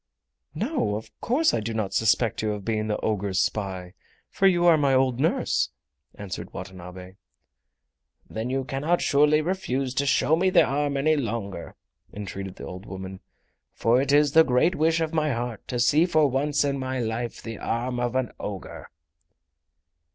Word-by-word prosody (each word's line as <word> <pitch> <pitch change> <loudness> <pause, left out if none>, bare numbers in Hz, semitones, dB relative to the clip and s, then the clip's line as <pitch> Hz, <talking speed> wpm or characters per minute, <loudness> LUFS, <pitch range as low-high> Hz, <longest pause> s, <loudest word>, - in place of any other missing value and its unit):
"No, 220 - -1
of 110 0 -7
course 295 +7 +2
I - - +1
do 110 +1 -4
not 105 -3 -2
suspect 110 0 +2
you 110 -1 -1
of 100 -2 -7
being 110 -1 -1
the 105 - -1
ogre's 100 -3 -1
spy, 95 -2 -2 0.4
for 195 - +3
you 175 -2 +3
are 170 -2 +7
my 140 -3 +2
old 130 -2 +2
nurse," 155 +4 +1 0.5
answered 95 -3 -7
Watanabe. 95 0 -9 1.1
"Then 110 +3 -4
you 135 +1 -1
cannot 145 +7 0
surely 150 +1 +4
refuse 140 -7 -2
to 140 +1 0
show 155 +2 +3
me 185 +3 +2
the 185 - +5
arm 140 +1 -1
any 155 +3 +3
longer." 105 - -4 0.4
entreated 95 -2 -6
the - - -9
old 95 +3 -9
woman; 95 0 -7 0.6
"for 120 +3 +3
it 140 0 0
is 145 0 +4
the 160 +2 +7
great 130 +6 +2
wish 165 0 +1
of 160 0 -2
my 155 -3 +1
heart 115 -2 -5
to 125 - -3
see 145 +8 +4
for 155 -4 +3
once 145 +3 +1
in 140 -1 -1
my 130 0 -3
life 115 0 -3
the 115 -2 -7
arm 120 +2 -2
of 120 0 -1
an 130 -2 0
ogre!" 100 -3 -7
125 Hz, 175 wpm, -25 LUFS, 105-150 Hz, 1.1 s, are